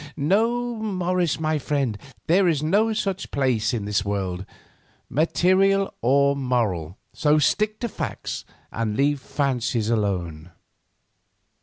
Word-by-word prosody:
No, 230 +9 +1
Morris, 185 -6 -1
my 155 -1 0
friend, 140 -5 -1 0.3
there 185 +3 +4
is 155 -4 +1
no 205 +8 +2
such 195 -3 -2
place 125 -5 +1
in 115 -5 -3
this 105 -1 0
world, 95 -2 -3 0.7
material 185 - +2
or 140 +3 +3
moral; 110 - -1 0.2
so 150 0 +3
stick 210 +11 +1
to 240 - 0
facts, 215 - -5 0.3
and 110 -2 -2
leave 145 +1 +2
fancies 125 -6 -1
alone." 90 -7 -2
140 Hz, 120 wpm, -24 LUFS, 110-185 Hz, 0.7 s, there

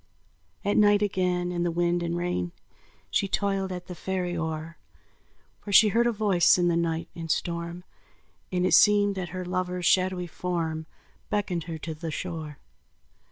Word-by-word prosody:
At 205 - +2
night 205 0 +5
again 180 -3 0
in 175 -1 -2
the 175 - +1
wind 175 +1 +1
and 170 0 -2
rain, 130 - -2 0.6
She 200 - +1
toiled 195 -1 -1
at 180 -1 -6
the 180 - -7
ferry 180 -1 -3
oar; 160 0 -4 0.8
For 205 - -8
she 210 +2 +7
heard 235 +3 +3
a - - +3
voice 200 -7 +4
in 175 -1 +2
the 170 - +2
night 165 -1 -1
and 165 -1 -6
storm, 170 +1 -2 0.7
And 180 -1 +1
it - - +2
seemed 205 -1 +6
that 185 -3 -4
her 185 +1 -5
lover's 180 0 -2
shadowy 185 0 +2
form 165 -2 -3 0.4
Beckoned 180 -5 -1
her 165 -2 -5
to 160 +1 -5
the 160 +1 -6
shore. 155 -3 -5
180 Hz, 165 wpm, -27 LUFS, 170-190 Hz, 0.8 s, she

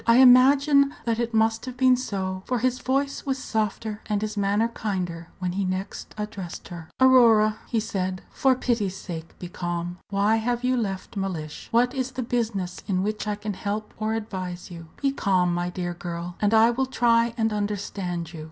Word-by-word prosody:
I 230 - +6
imagine 275 +3 +6
that 230 -1 0
it 235 -1 -1
must 225 +2 +1
have 255 0 -6
been 255 0 +5
so, 190 -6 -3
for 250 - +1
his 255 +2 0
voice 275 +1 -1
was 270 -1 -1
softer 220 -2 -2
and 210 -1 0
his 215 0 -3
manner 205 +3 +1
kinder 180 -7 -3
when 180 -1 -2
he 195 +2 -1
next 185 +1 -4
addressed 210 -4 -6
her. 170 -2 -9
"Aurora," 230 -5 +6
he 230 - 0
said, 190 -4 -3
"for 265 -1 +3
pity's 230 -7 -1
sake 165 -3 -8
be 180 - -7
calm. 175 0 -4
Why 205 +2 +2
have 240 +2 -1
you 255 0 +2
left 200 -4 -3
Mellish? 175 -6 -4
What 245 +2 +3
is 260 -1 -2
the 255 0 -3
business 220 -7 -2
in 185 -2 +1
which 215 +1 -2
I 210 - 0
can 210 0 -4
help 205 +2 -4
or 220 +1 0
advise 185 -5 -5
you? 165 -1 -9 0.2
Be 275 - +3
calm, 185 -8 +1
my 175 0 -1
dear 175 -1 -3
girl, 175 0 -6
and 205 -1 +3
I 225 +1 +6
will 260 +2 0
try 235 -2 +2
and 225 -1 +1
understand 195 -4 -3
you. 165 - -7
210 Hz, 190 wpm, -25 LUFS, 185-240 Hz, 0.2 s, I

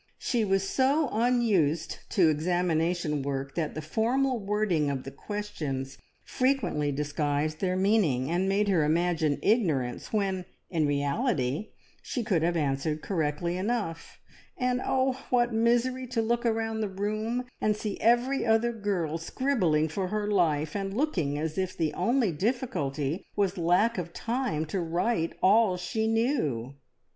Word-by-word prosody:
She 235 -3 0
was 195 -1 +1
so 275 +4 +2
unused 210 -10 +1
to 180 -7 +4
examination 165 -1 0
work 135 0 -3
that 160 -3 -2
the 155 - -4
formal 245 - +1
wording 200 -7 0
of 135 -2 -3
the 135 - -7
questions 140 -7 -5 0.2
frequently 255 - 0
disguised 150 +1 -1
their 185 -1 0
meaning, 185 - +2
and 180 +3 0
made 205 +1 +2
her 180 -6 +3
imagine 160 -1 +1
ignorance 155 - +1
when 195 -4 0 0.3
in 160 -4 +1
reality 145 - -1 0.3
she 245 - -3
could 185 -7 +1
have 170 +1 +1
answered 150 +1 -1
correctly 170 0 -1
enough; 195 -5 -3 0.4
and 250 0 0
oh, 260 0 +1
what 240 -1 +2
misery 240 +3 +1
to 240 -2 0
look 235 +2 0
around 225 -1 -1
the 210 - -1
room 215 +5 -2 0.2
and 215 0 +2
see 210 -2 -4
every 240 +4 +3
other 230 +1 +2
girl 185 -7 -2
scribbling 170 - +1
for 185 +4 -2
her 210 +2 -2
life, 160 -7 +1
and 195 0 -3
looking 170 - 0
as 155 +3 -2
if 185 0 -2
the 155 -3 0
only 240 - +1
difficulty 170 - -2
was 200 -2 +1
lack 180 +6 +2
of 170 -1 -6
time 235 - -2
to 175 +5 -3
write 170 +1 0
all 200 -1 +5
she 220 +5 -1
knew! 225 - 0
190 Hz, 145 wpm, -28 LUFS, 155-225 Hz, 0.4 s, all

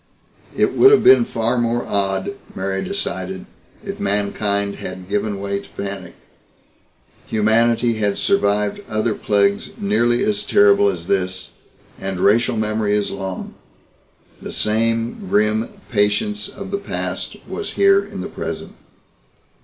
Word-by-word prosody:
It - - +2
would 400 - +7
have 420 - +5
been 380 -11 +7
far 120 - -1
more 120 0 0
odd, 95 -1 0 0.2
Mary 95 0 -2
decided, 95 - -3 0.4
if - - -6
mankind 100 0 0
had 95 0 -7
given 105 0 -1
way 100 0 -2
to - - -14
panic. 100 -3 -6 1.1
Humanity 115 +2 +2
had 105 -2 0
survived 105 - +1
other 110 +1 0
plagues 100 -1 +1
nearly 115 +4 +1
as 105 -1 0
terrible 100 0 +5
as 85 -3 -4
this 95 -1 -1 0.5
and 95 -1 -4
racial 115 +4 +3
memory 110 -1 0
is 105 -1 0
long. 95 -1 -5 0.9
The - - -7
same 115 - -1
grim 110 +2 +2 0.2
patience 125 - 0
of 195 -1 -8
the 200 - -1
past 200 - -4
was 420 - -5
here 395 0 +4
in - - -7
the - - -4
present. - - -6
105 Hz, 130 wpm, -20 LUFS, 100-115 Hz, 1.1 s, would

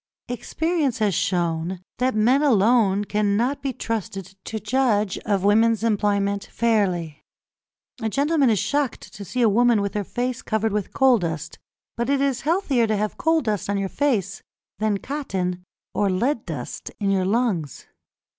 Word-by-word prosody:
Experience 300 +1 -1
has 210 -4 +1
shown 175 -2 -1 0.2
that 255 -2 +1
men 245 +6 +3
alone 215 -5 +3
cannot 210 +7 0
be 275 -1 -1
trusted 195 -5 -5
to 220 - -4
judge 215 -3 +1
of 200 -3 +1
women's 220 +2 +3
employment 200 -2 +1
fairly. 185 -9 0 0.8
A 220 - 0
gentleman 285 +2 +2
is 215 - +3
shocked 255 +6 -2
to 200 - -8
see 245 +6 -1
a - - +6
woman 235 +1 +4
with 200 -1 -2
her 210 -1 -1
face 245 +4 -3
covered 220 -1 -1
with 210 -2 -2
coal 260 -3 +4
dust; 165 -3 -4 0.4
but 235 +2 -1
it 280 -1 +2
is 275 -3 0
healthier 290 - +1
to 215 -1 0
have 210 +1 -2
coal 320 0 +2
dust 210 - -2
on 200 - +1
your 195 -1 -2
face 215 - -1 0.4
than 215 -1 +1
cotton 190 -10 -3 0.3
or 200 +1 +1
lead 230 +6 0
dust 145 -7 -6
in 200 -2 +1
your 190 -1 +1
lungs. 195 - -1
215 Hz, 160 wpm, -23 LUFS, 195-250 Hz, 0.8 s, a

